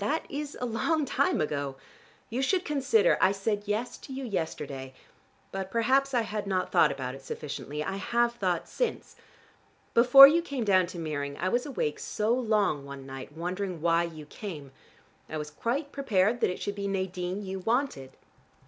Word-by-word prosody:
That 305 +10 0
is 290 0 -5
a 250 - -2
long 250 +7 0
time - - +1
ago. 140 -3 -2 0.6
You 245 +3 -1
should 360 +6 +1
consider. 300 - +3
I 185 - +5
said 205 +1 -2
'yes' 220 +4 -2
to - - -11
you 265 +1 -5
yesterday, 145 - -4 0.6
but 190 0 -4
perhaps 260 +5 +2
I 240 - +4
had 210 -2 -4
not 185 -2 -1
thought 150 - +5
about 130 -2 -4
it 135 - -10
sufficiently. 150 +2 -5
I 195 - -3
have 235 +4 +1
thought 185 -7 -1
since. - - -3 0.8
Before 255 +3 +10
you 325 +4 +3
came 280 -7 -3
down 185 -4 +4
to 175 - -8
Meering 145 -3 -3
I 185 - 0
was 245 +7 0
awake 150 - -2
so 215 +2 0
long 215 - +1
one 140 -1 -9
night, 135 +1 -8
wondering 180 +1 -3
why 165 +1 +3
you 160 -3 -9
came. 150 -5 -8 0.6
I 155 - -4
was 150 0 -5
quite 265 - -2
prepared 230 -4 +1
that - - +3
it 180 - -4
should 205 - -3
be 200 0 -4
Nadine 190 0 -3
you 190 0 -4
wanted. 225 - -1
200 Hz, 180 wpm, -28 LUFS, 155-245 Hz, 0.8 s, Before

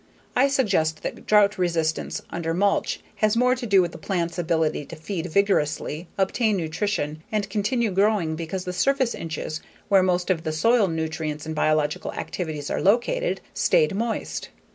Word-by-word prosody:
I 265 +2 +5
suspect 195 - +1
that - - -6
drought 210 -1 +4
resistance 165 -3 -1
under 165 -1 -2
mulch 200 +2 +1 0.2
has 215 +1 +2
more 250 +1 +4
to 250 -1 -4
do 195 -3 +5
with 170 - -4
a 165 - -9
plant's 170 -1 -2
ability 160 -3 0
to - - -8
feed 165 +2 -4
vigorously, 165 -3 0
obtain 205 +2 +1
nutrition, 160 -2 -2
and 210 -2 0
continue 215 +2 0
growing 195 -4 +2
because 170 +3 -4
the 180 - -3
surface 260 +4 +2
inches 160 -1 -5 0.3
where 195 -2 +6
most 180 0 +1
of 165 -3 0
soil 230 +4 +4
nutrients 160 -2 -3
and 160 - -4
biological 155 -1 +1
activities 155 -5 -4
are - - -1
located, 245 - +2
stayed - - +3
moist. 225 +3 -3
180 Hz, 160 wpm, -24 LUFS, 160-210 Hz, 0.3 s, where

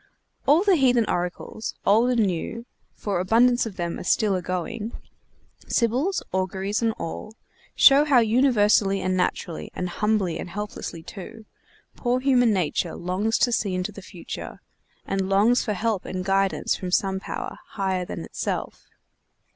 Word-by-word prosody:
All 310 +6 +5
the 395 -4 +4
heathen 250 -4 +3
oracles, 180 +5 -3
old 225 +5 +4
and 235 -4 +3
new 195 +6 -3 0.3
(for 200 -4 -2
abundance 235 +6 +3
of 205 - -8
them 170 -2 -3
are - - -6
still 205 +2 +2
agoing,) 185 +6 -3 0.7
sibyls, 255 - +1
auguries 190 +3 -1
and 230 -1 +2
all, 215 +5 -7 0.4
show 275 +1 +7
how 285 -4 +4
universally 215 -4 +3
and 185 0 -1
naturally, 180 -2 -2
and 180 - -2
humbly 210 -3 0
and - - -6
helplessly 200 -4 -6
too, 215 +5 -10 0.5
poor 245 0 0
human 255 -3 +3
nature 175 -3 -1
longs 190 +6 -1
to 245 - +2
see 200 -5 0
into 185 +3 -2
the 200 - -10
future, 185 -2 -8 0.5
and 195 -1 -1
longs 210 +5 +4
for 215 - -1
help 215 0 -1
and 185 0 -4
guidance 195 0 +1
from 185 - -5
some 190 +1 +1
power, - - -6
higher 190 -2 -2
than - - -6
itself. - - -4
205 Hz, 150 wpm, -24 LUFS, 185-235 Hz, 0.7 s, show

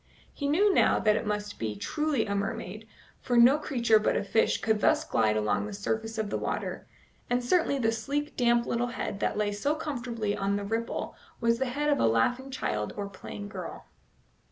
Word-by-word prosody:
He 285 - -3
knew 385 +8 +4
now - - +4
that 215 -1 +3
it 215 - -2
must 210 -1 -3
be 110 -2 -2
truly 300 - -1
a 200 - -2
mermaid, 200 +1 -4 0.3
for 245 -1 0
no 250 +5 +7
creature 235 -7 +3
but 210 - +1
a - - -1
fish 220 +2 +2
could 220 -1 +1
thus 310 0 +3
glide 110 - +1
along 105 - 0
the 210 - -7
surface 225 +3 -3
of 215 -2 -2
the - - -1
water, - - -3 0.4
and 245 0 +1
certainly 320 0 +2
the 225 -4 +2
sleek, 280 +7 -3
damp 240 -1 +3
little 235 +1 0
head 220 -4 -4
that 205 - -1
lay 210 -1 +1
so 280 +9 0
comfortably 240 -9 -3
on 200 0 0
the 205 - -2
ripple 225 +3 -3 0.2
was 230 0 +2
the 265 - +1
head 295 +3 0
of 285 - +2
a - - +4
laughing 245 - +1
child 105 - -2
or 200 -1 -3
playful 200 +1 -8
girl. 205 - -7
225 Hz, 205 wpm, -28 LUFS, 205-265 Hz, 0.4 s, no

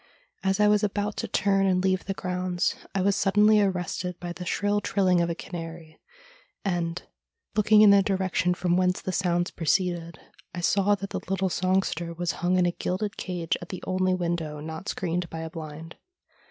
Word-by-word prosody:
As 195 +1 0
I 210 - +5
was 210 0 +3
about 205 0 -1
to - - -2
turn 195 -1 +2
and 185 -1 +2
leave 185 -1 +1
the 195 - -3
grounds 180 -1 -1 0.2
I 190 - +1
was 200 0 +3
suddenly 210 +2 +4
arrested 180 -2 -2
by 175 -1 -5
the 180 - -7
shrill 205 +2 +1
trilling 185 -4 +2
of 170 - 0
a 170 - -2
canary, 165 -2 -8 0.7
and, 175 -2 -1 0.6
looking 215 0 +6
in 205 - +8
the 200 0 +7
direction 190 -2 0
from 175 0 +1
whence 180 0 +2
the 185 - -4
sounds 175 -2 0
proceeded, 170 0 -1 0.4
I 175 - -4
saw 200 +3 +3
that 195 0 -7
the - - -2
little 190 0 0
songster 175 -2 0
was 175 0 -1
hung 180 +1 +2
in 180 - +3
a 175 - +2
gilded 200 +4 -3
cage 175 -3 -2
at 175 - -9
the 185 - -7
only 185 0 +1
window 170 -4 -2
not 160 +4 -6
screened 175 -1 -2
by 160 - -6
a 160 0 -6
blind. 160 0 -8
180 Hz, 190 wpm, -26 LUFS, 170-195 Hz, 0.7 s, in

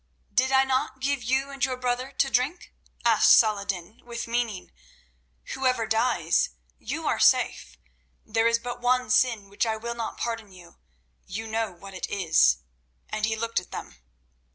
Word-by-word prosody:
"Did 260 +1 +2
I 265 0 +5
not 265 0 -1
give 275 0 0
you 265 +4 0
and 275 -2 -5
your 255 -1 +1
brother 250 +1 -2
to 270 0 +1
drink?" 265 +8 -1 0.3
asked 230 -2 +7
Saladin 200 -2 0
with 235 -1 -5
meaning. 230 -5 -2 0.8
"Whoever 255 -3 +1
dies, 220 -7 +2 0.3
you - - -5
are - - +1
safe. - - +2 0.5
There 225 +1 +2
is 230 0 +3
but 245 +1 -6
one 250 +1 +1
sin 245 -5 +2
which 200 +4 -1
I 220 0 -1
will 235 +2 -4
not 230 -2 -5
pardon 225 -3 -4
you—you 60 - -12
know 220 -1 -2
what 195 +2 -12
it 185 - -5
is," 155 - +3 0.5
and 215 0 -1
he 220 - 0
looked 230 -1 -1
at 180 - -14
them. - - -8
230 Hz, 160 wpm, -26 LUFS, 200-250 Hz, 0.8 s, asked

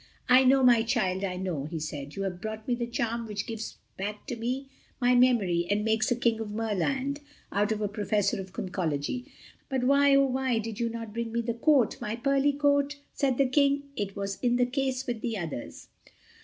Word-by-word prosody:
"I 255 +1 +7
know, 265 +1 +5
my 240 -2 +6
child, 200 -5 0
I 185 -2 -2
know," 180 -7 -3
he 160 +2 -5
said. 150 -2 -6
"You 195 - -3
have 180 -2 -4
brought 220 +1 -6
me 250 - +1
the 240 0 -2
charm 235 -1 -2
which 210 -1 -3
gives 225 -1 -6 0.2
back 205 +2 -5
to 260 - -4
me 250 +4 -3 0.3
my 250 -1 +4
memory 215 -9 +3
and 210 +1 +1
makes 220 0 +2
a 245 - +2
King 230 -2 +1
of 220 -2 -4
Merland 225 - -1 0.3
out 205 +2 +1
of 215 -1 -1
a 210 - +1
Professor 205 -1 0
of 190 0 -10
Conchology. 180 - -2 0.4
But 265 -2 -1
why, 280 +1 +5
oh 275 0 +5
why, 260 -2 0
did 225 -1 -4
you 235 -1 0
not 230 -2 -6
bring 230 0 -3
me 235 +1 -1
my 235 - 0
coat—my 235 -4 +2
pearly 275 +3 +2
coat?" 285 0 +2 0.2
said 265 -3 +1
the 275 - +4
King, 280 +1 +2
"it 200 -3 -3
was 200 0 -4
in 245 -1 +2
the 245 0 +3
case 260 0 -1
with 240 -4 -3
the 230 -3 -2
others." 145 - -6
230 Hz, 210 wpm, -28 LUFS, 205-260 Hz, 0.4 s, I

